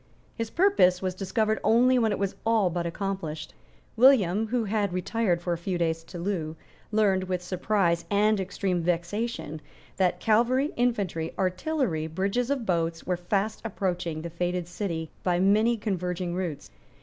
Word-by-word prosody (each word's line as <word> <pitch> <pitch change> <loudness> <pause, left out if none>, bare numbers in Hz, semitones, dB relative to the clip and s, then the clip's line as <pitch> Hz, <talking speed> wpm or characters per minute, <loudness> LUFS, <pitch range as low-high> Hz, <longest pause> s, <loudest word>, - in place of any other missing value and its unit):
His 230 -2 -4
purpose 335 - +4
was 185 -1 -1
discovered 215 +3 0
only 250 +3 +4
when 225 -2 +2
it - - 0
was 200 0 -2
all 220 -5 +2
but 170 0 -2
accomplished. 170 -4 -4 0.4
William, 220 -5 +5
who 240 +1 0
had 205 -3 -1
retired 185 -1 0
for 175 - 0
a 170 - -4
few 180 +1 -2
days 165 -1 -1
to 180 - -9
Loo, 170 -4 -2 0.4
learned, 200 -3 +2
with 180 -1 -2
surprise 180 -1 +1
and 210 +1 +3
extreme 190 -1 -1
vexation, 175 0 -2 0.4
that 185 -2 +2
cavalry, 245 +6 +2
infantry, 200 -10 -1
artillery, 185 - -1
bridges 195 - -1
of 275 -5 -1
boats, 165 -3 0
were 180 - 0
fast 195 +4 -1
approaching 180 -6 -2
the 170 - -5
fated 175 +1 -2
city 170 -3 -4
by 175 -1 +1
many 215 +5 +3
converging 180 -4 -2
routes. 170 - -4
190 Hz, 155 wpm, -27 LUFS, 175-220 Hz, 0.4 s, William